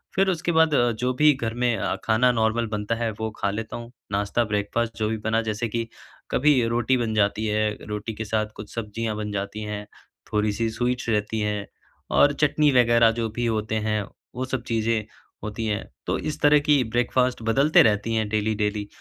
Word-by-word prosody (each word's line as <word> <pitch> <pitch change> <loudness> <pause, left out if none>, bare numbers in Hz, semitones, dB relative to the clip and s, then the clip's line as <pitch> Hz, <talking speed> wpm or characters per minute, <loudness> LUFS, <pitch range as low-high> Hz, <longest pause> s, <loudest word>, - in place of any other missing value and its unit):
फिर 190 0 +3
उसके 170 -1 0
बाद 160 -2 +4
अ, 120 -2 +3
जो 125 +3 -1
भी 150 +4 +5
घर 115 -4 -3
में 120 -2 +2
अ, - - -1
खाना 120 +3 +3
नॉर्मल 115 0 +1
बनता 105 +2 -1
है 115 0 -1
वो 110 0 -2
खा 100 - 0
लेता 110 +2 -5
हूँ। 120 0 -9 0.2
नाश्ता 100 +4 +1
ब्रेकफ़ास्ट 110 +2 -2
जो 110 -1 0
भी 110 - -1
बना 115 +1 +2
जैसे 110 +2 -2
कि 115 +1 -3 0.4
कभी 150 +3 +4
रोटी 120 +2 +1
बन 115 -3 -1
जाती 105 +1 +1
है, 105 0 0
रोटी 105 +1 -4
के 110 +1 -5
साथ 110 0 0
कुछ 105 - -10
सब्ज़ियाँ 110 0 -3
बन 105 -1 -4
जाती 100 +2 -4
हैं। 105 0 -5 0.5
थोड़ी-सी 105 +1 0
स्वीट्स 120 +2 -2
रहती 110 0 0
हैं 105 -1 -1 0.5
और 145 - +6
चटनी 150 0 +2
वग़ैरह 120 -2 +5
जो 115 - 0
भी 120 - -1
होते 110 -1 -1
हैं, 105 0 +1 0.3
वो 130 +1 -2
सब 130 -2 -3
चीज़ें 115 -1 0 0.4
होती 105 +2 -4
हैं। 105 0 -1 0.2
तो - - +1
इस 155 0 -4
तरह 145 0 +6
की 145 -2 +3
ब्रेकफ़ास्ट 120 +2 0
बदलते 140 +6 +5
रहती 105 +1 +1
हैं 110 -1 0
डेली-डेली। 105 -1 -1
115 Hz, 195 wpm, -24 LUFS, 105-120 Hz, 0.5 s, और